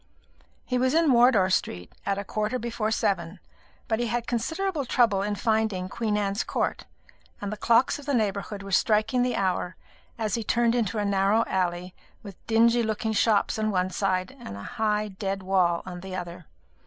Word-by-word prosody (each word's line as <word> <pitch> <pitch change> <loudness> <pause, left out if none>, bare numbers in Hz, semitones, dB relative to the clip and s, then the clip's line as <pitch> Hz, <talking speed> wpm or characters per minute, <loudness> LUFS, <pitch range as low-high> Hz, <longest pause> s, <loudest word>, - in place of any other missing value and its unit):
He 250 -1 0
was 260 +3 +2
in 325 -3 +4
Wardour 235 -6 +5
Street 90 - -2
at 200 -1 +1
a 200 - -3
quarter 215 +4 -2
before 235 -2 -2
seven, 185 -4 -1 0.5
but 220 0 0
he 240 - 0
had 235 +1 -2
considerable 320 - -1
trouble 230 -6 +2
in 205 +1 -1
finding 215 -4 0
Queen 215 -1 -1
Anne's 200 +1 -1
Court, - - -2 0.5
and 205 0 -4
the - - -3
clocks 235 +6 +3
of 290 - -12
the 285 - +1
neighbourhood 200 -2 -2
were 195 - -8
striking 215 +5 +2
the 250 0 +1
hour 185 -2 -1 0.4
as 220 -3 -2
he 230 - -1
turned 235 +2 +2
into 225 -4 0
a 205 - 0
narrow 200 +3 +2
alley 180 -1 -2 0.3
with 200 -3 -11
dingy 230 +1 +4
looking 220 0 -1
shops 215 0 +2
on 215 0 +1
one 185 -2 0
side 185 +4 -1
and 100 - -8
a 100 - -8 0.2
high 210 -1 +1
dead 195 0 -4
wall 180 -3 +2
on 180 -1 -7
the 190 +1 -7
other. 175 -2 -7
210 Hz, 185 wpm, -26 LUFS, 190-235 Hz, 0.5 s, Wardour